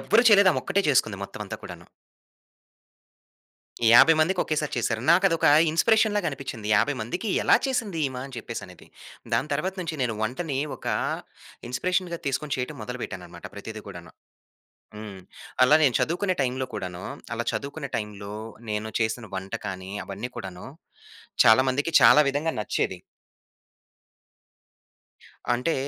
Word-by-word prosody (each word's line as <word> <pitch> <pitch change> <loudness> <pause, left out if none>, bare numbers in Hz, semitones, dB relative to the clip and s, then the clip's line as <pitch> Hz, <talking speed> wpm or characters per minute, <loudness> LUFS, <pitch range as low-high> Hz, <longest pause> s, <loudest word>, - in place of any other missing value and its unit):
ఎవ్వరు 205 - +4
చేయలేదు. 200 -3 +7
ఆమొక్కటే 195 0 0
చేసుకుంది 115 -7 +2
మొత్తమంతా - - -7
కూడాను. - - -10 2.0
50 120 +8 +8
మందికి 180 +4 +2
ఒకేసారి 150 -1 -2
చేసారు. 115 -1 -1
నాకదొక 170 -1 +4 0.2
ఇన్స్‌పిరేషన్ 220 +5 +3
లాగ 205 -3 0
అనిపిచ్చింది. 130 -6 -7
50 145 +8 +2
మందికి 180 - -4
ఎలా - - +6
చేసింది 225 -10 -2
ఈమ? 130 - -6
అని 135 - -11
చెప్పేసనేది. 100 -5 -8 0.5
దాని 150 - 0
తర్వాత 155 +7 -1
నుంచి 165 -3 -4
నేను 120 -3 -1
వంటని 135 +5 -2 0.2
ఒక - - -13 0.8
ఇన్స్‌పిరేషన్‌గా 180 +5 -1
తీసుకొని 140 +2 -1
చేయటం 125 0 -4
మొదలుపెట్టానన్నమాట 90 -8 -7
ప్రతీది 110 +1 -8
కూడాను. 85 -4 -10 0.9
హ్మ్. 105 -3 -8 0.4
అలా 125 +4 +6
నేను 130 -5 +3
చదువుకునే 185 +4 0
టైమ్‌లో 130 0 -1
కూడాను, 90 -1 -6 0.3
అలా - - -2
చదువుకునే 140 0 -5
టైమ్‌లో 105 -2 -6 0.4
నేను 105 +1 -2
చేసిన 110 +1 -1
వంట 95 0 -6
కాని, 95 -1 -6
అవన్నీ 105 +5 -6
కూడాను 95 -2 -7 0.8
చాలా 110 +3 +7
మందికి, 140 +5 -1
చాలా 150 - +8
విధంగా 150 +4 -1
నచ్చేది. 105 - -2 2.5
అంటే 125 +7 0
130 Hz, 125 wpm, -25 LUFS, 105-165 Hz, 2.5 s, 50